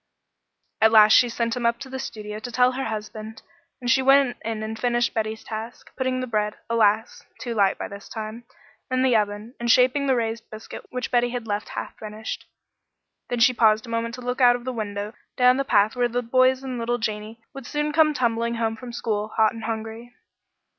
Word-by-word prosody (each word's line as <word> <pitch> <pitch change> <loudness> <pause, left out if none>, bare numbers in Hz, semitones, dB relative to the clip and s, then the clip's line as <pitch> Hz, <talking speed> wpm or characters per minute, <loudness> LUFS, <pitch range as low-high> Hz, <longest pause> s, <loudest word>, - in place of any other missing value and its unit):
At 220 0 +6
last 215 -1 +7
she 245 - +6
sent 230 0 -1
him 245 - -4
up 235 0 +1
to 275 - -6
the 265 0 -6
studio 215 -4 -6
to 245 +2 -7
tell 250 +1 +4
her 265 +1 -3
husband, 220 0 -6 0.4
and 245 - -6
she 265 - +4
went 270 -1 +4
in 220 -1 -3
and 220 0 -5
finished 240 0 +1
Betty's 220 0 -2
task, 225 +2 -8
putting 260 -1 -1
the - - -2
bread 210 -3 -1 0.2
alas! 220 0 +2 0.2
too 235 0 -4
light 200 -3 +2
by - - -4
this 200 0 -11
time 220 +1 -6 0.5
in 255 0 +1
the 255 -3 +3
oven, 210 +2 -1
and 235 0 -2
shaping 255 +4 +4
the 265 - +3
raised 225 -1 -3
biscuit 215 0 -10
which 250 0 -4
Betty 245 0 +3
had 240 -1 -4
left 210 -1 -3
half - - -5
finished. 215 0 -6 0.8
Then 240 -1 -1
she 250 +2 +6
paused 220 -2 +3
a - - -11
moment 230 0 -2
to 250 - -10
look 250 +2 -3
out 245 -1 +7
of 245 - -7
the 255 - -3
window 205 -1 -4 0.2
down 250 0 +5
the 275 - +1
path 215 -4 +3
where 245 -1 +2
the 245 +1 -2
boys 255 +2 +3
and 255 -2 -4
little 240 +1 0
Janey 215 0 -4
would 270 -2 -9
soon 295 0 -1
come 305 -1 +4
tumbling 235 -2 0
home 225 -1 -1
from 240 +2 -9
school, 215 -3 -2
hot 220 0 +2
and 225 -1 -7
hungry. 225 +2 -5
230 Hz, 215 wpm, -24 LUFS, 220-250 Hz, 0.8 s, last